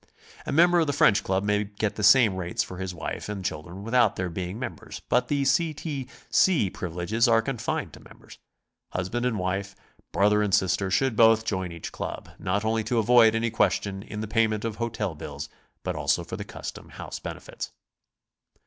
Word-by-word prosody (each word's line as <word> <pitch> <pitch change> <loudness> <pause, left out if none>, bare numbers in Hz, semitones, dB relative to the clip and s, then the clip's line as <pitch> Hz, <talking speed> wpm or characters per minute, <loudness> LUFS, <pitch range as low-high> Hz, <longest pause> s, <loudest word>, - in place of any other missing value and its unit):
A - - -3
m.ember 175 +3 +5
of 160 - +2
the 145 - 0
French 100 - +4
Club 95 +1 0
may 105 0 +1
get 105 0 -3
the - - -4
same 110 -1 +6
rates 90 -2 -1
for 90 - -9
his 95 -1 -3
wife 85 +3 -5
and 100 -3 -5
children 85 +5 -5
without 115 -1 +3
their 90 -1 -2
being 90 +3 -4
members, 115 -3 -6
but 125 - +2
the 140 -1 0
C. 155 +3 +2
T. 140 -5 -5 0.2
C. 155 - +3
privi 85 -3 -6
leges 110 +7 +1
are 115 -1 +4
confined 120 -3 -3
to - - -11
members. - - -16 0.5
Husband 115 +7 -1
and 115 -3 -1
wife, 95 +1 -2 0.4
brother 105 +1 +3
and 105 -2 +3
sister, 95 0 +1
should 130 +6 +1
both 115 0 +5
join 95 -4 -2
each 85 -1 -7
club, - - -6
not 100 +4 -1
only 110 0 +1
to 120 +2 0
avoid 115 0 +5
any 115 0 0
question 100 -3 0
in 105 +1 -6
the 110 - -4
payment 110 -1 +1
of 110 -2 -3
hotel 115 -5 -2
bills, 75 - -7 0.3
but - - -2
also - - +1
for - - -6
the - - -5
custom - - -8
house - - -7
benefits. - - -7
105 Hz, 195 wpm, -26 LUFS, 95-115 Hz, 0.5 s, same